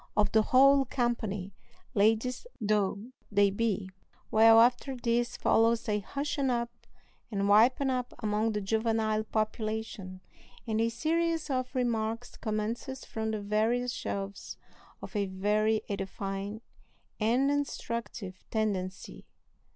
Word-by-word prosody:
of 210 - +3
the 220 - +5
whole 275 +4 +5
company, 220 -7 -2 0.4
ladies 225 - +1
though 210 +1 0 0.2
they 200 -1 +4
be. 205 -2 -1 0.4
Well, 225 +1 +7
after 245 +3 +3
this 240 0 0
follows 230 0 +2
a 210 -1 +1
hushing 280 +5 -2
up 235 -1 -1 0.6
and 200 -2 -1
wiping 245 +6 +4
up 250 -1 -2
among 215 0 0
the 210 - -1
juvenile 220 +1 0
population, 215 -3 -3 0.4
and 220 -1 0
a 230 - +2
series 325 +5 0
of 255 0 -2
remarks 230 -1 -1
commences 225 +5 -3
from 220 0 -3
the 215 -1 -2
various 225 +4 0
shelves 200 -4 -5 0.5
of - - -9
a 200 -1 +1
very 210 +3 +1
edifying 195 +1 -4 0.6
and 245 +6 +2
instructive 230 -8 -4
tendency. 190 -4 -3
220 Hz, 120 wpm, -30 LUFS, 210-245 Hz, 0.6 s, Well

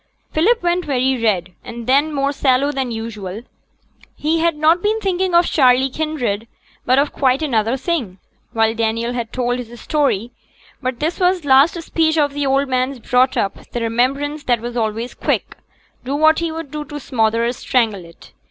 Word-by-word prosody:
Philip 405 +7 +2
went 350 +1 +1
very 260 -2 0
red, 185 -5 0
and 235 0 -8
then 280 +5 +3
more 280 -1 0
sallow 275 0 +2
than 265 -3 -2
usual. 225 -3 -6 0.7
He 315 +2 0
had 335 -1 +2
not 315 +3 +3
been 430 +2 +1
thinking 375 -3 0
of 345 0 +5
Charley 260 -1 +3
Kinraid, 250 -9 -2 0.4
but 255 - +4
of 285 +1 +2
quite 265 +2 +1
another 230 -3 +1
thing, 265 - -2 0.3
while 225 -1 +2
Daniel 230 +1 -1
had 235 -2 -4
told 245 -1 -1
his 240 -1 -9
story; 260 -7 0 0.5
but 255 -2 -3
this 320 +3 -2 0.3
last 280 +5 +5
speech 320 0 +1
of 290 -2 +2
the 285 -1 -1
old 275 +1 +2
man's 255 +1 -1
brought 250 +2 +2
up 195 - -3
the 240 - -2
remembrance 275 +6 0
that 240 -2 +2
was 240 +1 -6
always 225 +1 -2
quick, - - -2 0.5
do 270 +3 -3
what 315 +2 +4
he 335 -1 -2
would 320 -3 -7
to 295 -1 -6
smother 230 -3 0
or 235 - +1
strangle 230 -7 0
it. 170 0 -16
260 Hz, 175 wpm, -19 LUFS, 230-300 Hz, 0.7 s, of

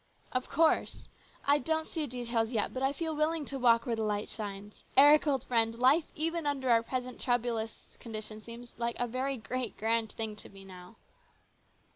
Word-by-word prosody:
" - - -36
Of 255 0 -2
course. 320 +1 +2 0.4
I 285 +1 +4
don't 320 +1 0
see 315 -3 -3
details 235 -2 -1
yet, 225 -4 -1
but 260 - -4
I 270 +1 +2
feel 320 +2 -3
willing 305 0 0
to 275 -1 -5
walk 230 -2 +4
where 235 - 0
the 225 - -3
light 210 -1 -1
shines. 205 -1 -7
Eric, 295 +3 +7
old 270 -4 +1
friend, 230 -1 +1
life 270 +6 +4
even 330 0 -1
under 265 -3 0
our 230 -1 +5
present 250 +1 -4
troublous 235 -3 -2
conditions 215 -1 -7
seems 235 +1 -9
like 235 0 -1
a 245 - +1
very 260 +3 -2
great, 245 +1 -4
grand 225 0 +1
thing 220 -1 -3
to - - -10
me 195 -1 -13
now." 185 +2 -12
245 Hz, 190 wpm, -31 LUFS, 225-275 Hz, 0.4 s, Eric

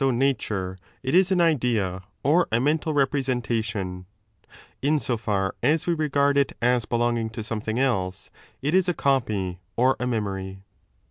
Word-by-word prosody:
MEMORY 135 -1 +3
AND 120 - -1
PHANTASM 135 0 +2
201 105 -3 -3
nature, 95 - -12 0.3
it 130 - -2
is 185 +1 +5
an 180 -2 +3
idea 120 - +1 0.2
or 165 +6 +3
a 115 - +3
mental 155 +4 +1
representation; 115 -9 -1 0.7
in 150 +4 +2
so 130 -4 0
far 100 -3 -1
as 155 +2 +2
we 175 - +2
regard 140 -3 +2
it 140 - +1
as 120 -1 +2
belonging 120 -1 0
to 115 +1 -6
aometliing 110 0 -3
else, 95 -8 -1 0.3
it 145 +3 0
is 185 -1 +3
a 175 - 0
copy 135 -5 +1
t6 95 -2 -3 0.2
or 130 +2 +4
a 125 - -1
memory. 95 -4 -3
125 Hz, 180 wpm, -25 LUFS, 105-140 Hz, 0.7 s, is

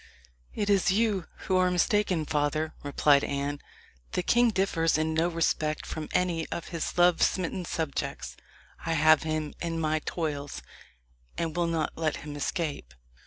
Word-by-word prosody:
"It 205 - -1
is 200 -3 +3
you 200 -3 +1 0.2
who 185 - +2
are 185 0 +4
mistaken, 180 -2 +1
father," 150 +1 0
replied 145 0 +3
Anne. 140 +1 -2 0.5
"The 180 - 0
king 240 +5 +4
differs 180 -6 +1
in 160 0 0
no 160 +2 +2
respect 160 -2 0
from 155 -1 -5
any 175 -3 0
of 170 - -5
his 165 -1 -4
love 175 -1 +5
smitten 185 0 0
subjects. 160 -4 -3 0.5
I 165 - -1
have 155 0 +5
him 155 -1 -2
in 165 -1 -2
my 155 -1 +1
toils, 145 - -3 0.7
and 165 -1 -2
will 175 -1 +1
not 165 -2 -1
let 155 -2 0
him 150 -1 -6
escape." 145 - -3
165 Hz, 155 wpm, -28 LUFS, 155-180 Hz, 0.7 s, love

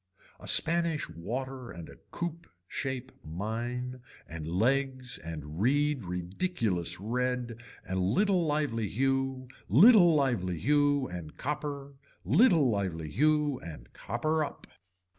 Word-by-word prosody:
A - - -11
Spanish 165 -2 +3
water 125 +9 -5
and 85 -1 -9
a - - -13
coop 170 -1 -5 0.2
shape 130 +2 -4
mine 120 +9 -4 0.3
and 80 -1 -7
legs 130 +7 0
and 80 0 -7
reed 145 0 +2
ridiculous 90 - -2
red, 120 +2 -2 0.3
and 95 0 -1
little 180 - +2
lively 145 -8 0
hue, 135 +2 -1 0.2
little 175 - +7
lively 115 - +1
hue 145 - +2
and 85 -4 -8
copper, 140 0 -4 0.3
little 170 - +5
lively 90 -8 -2
hue 150 - +2
and 75 -8 -10
copper 155 +7 -1
up. - - -7
125 Hz, 115 wpm, -30 LUFS, 95-145 Hz, 0.3 s, little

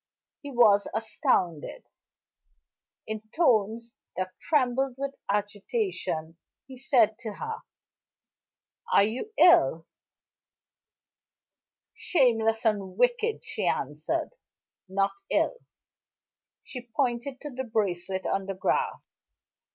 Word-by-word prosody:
He 285 - -7
was 220 -6 +5
astounded. 185 - 0 1.2
In 220 -1 -4 0.2
tones 230 - +2 0.2
that 185 0 -2
trembled 265 -3 +1
with 275 0 -3 0.2
agitation, 205 - -2 0.3
he 265 - -11
said 240 -4 +2
to 220 -2 -6
her: 450 - -5 1.3
"Are - - +6
you 240 - -3
ill?" 165 - +5 2.1
"Shameless 225 -7 +2
and 200 -4 0
wicked," 245 - +1
she - - -2
answered. - - -1 0.6
"Not 195 +1 +1 0.2
ill." - - +1 1.1
She 250 -2 -9
pointed 255 +1 -1
to 295 - -6
the 260 +1 -4
bracelet 190 -5 -2
on 195 0 -1
the 195 - -3
grass. 185 - -1
225 Hz, 95 wpm, -27 LUFS, 200-265 Hz, 2.1 s, Are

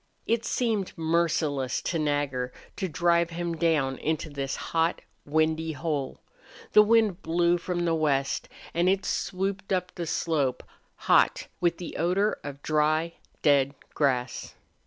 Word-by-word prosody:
It 230 0 +1
seemed 220 -8 -1
merciless 160 -5 0
to 165 - -1
Nagger 145 -4 -1 0.2
to 190 - -2
drive 170 +1 +2
him 170 0 -3
down 155 -5 +1
into 155 0 -2
this 135 -1 -3
hot, 165 +1 0 0.3
windy 160 +1 +1
hole. 145 -2 -3 0.5
The 210 - +8
wind 210 -3 +3
blew 170 +1 +2
from 175 0 -2
the 165 - +2
west, 140 -4 0 0.2
and 175 +2 +2
it 195 +1 +1
swooped 195 +1 -2
up 180 -1 0
the 170 -2 -5
slope, 145 -6 0 0.4
hot, - - +4
with 170 -1 +1
the 175 - -7
odor 190 +6 +1
of 145 -1 -8
dry, 155 +2 +1 0.3
dead 140 -2 +4 0.2
grass. 125 -4 -1
165 Hz, 135 wpm, -27 LUFS, 145-175 Hz, 0.5 s, The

